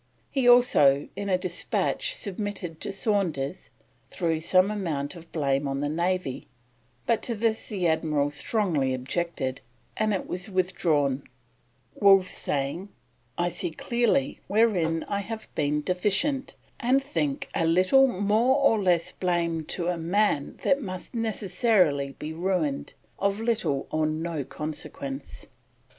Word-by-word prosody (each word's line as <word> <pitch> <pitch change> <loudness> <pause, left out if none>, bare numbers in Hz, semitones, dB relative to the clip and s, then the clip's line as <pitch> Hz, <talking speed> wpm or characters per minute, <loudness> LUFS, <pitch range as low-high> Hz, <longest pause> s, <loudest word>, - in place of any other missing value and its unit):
He 260 -3 +3
also, 150 - +5
in 200 0 -4
a 185 - +3
despatch 345 - -1
submitted 200 - -4
to - - -2
Saunders, 190 -7 -1 0.4
threw 165 -3 -1
some 185 +4 +3
amount 165 -8 -3
of 170 -1 -13
blame 140 -2 0
on 135 0 -2
the 145 - -1
Navy, 170 -3 -1 0.6
but 230 - +2
to 235 - -2
this 220 +1 -1
the 185 -5 0
Admiral 155 -3 +1
strongly 150 - 0
objected, 130 0 -3 0.3
and 215 0 +1
it 195 - -1
was 180 +4 -4
withdrawn, 165 -7 +1 0.7
Wolfe 195 -2 +5
saying: 145 +8 -2 0.5
"I 175 0 +1
see 175 - -2
clearly 220 - 0
wherein 185 -7 +2
I 200 - -1
have 220 +2 -6
been 150 0 0
deficient; 205 - 0 0.2
and 260 +3 +2
think 280 0 -2
a 165 - +1
little 185 +11 +5
more 220 +4 +2
or 275 -7 +3
less 175 -3 +2
blame 170 -3 -1
to 170 +2 -2
a 175 -1 -1
man 170 -3 0
that 280 +1 +3
must 185 -1 -7
necessarily 195 - +1
be 155 +1 -5
ruined, 165 -4 -1 0.2
of 200 +1 0
little 225 -11 0
or 155 0 +1
no 155 -1 -2
consequence." 140 -2 -6
180 Hz, 135 wpm, -26 LUFS, 155-210 Hz, 0.7 s, also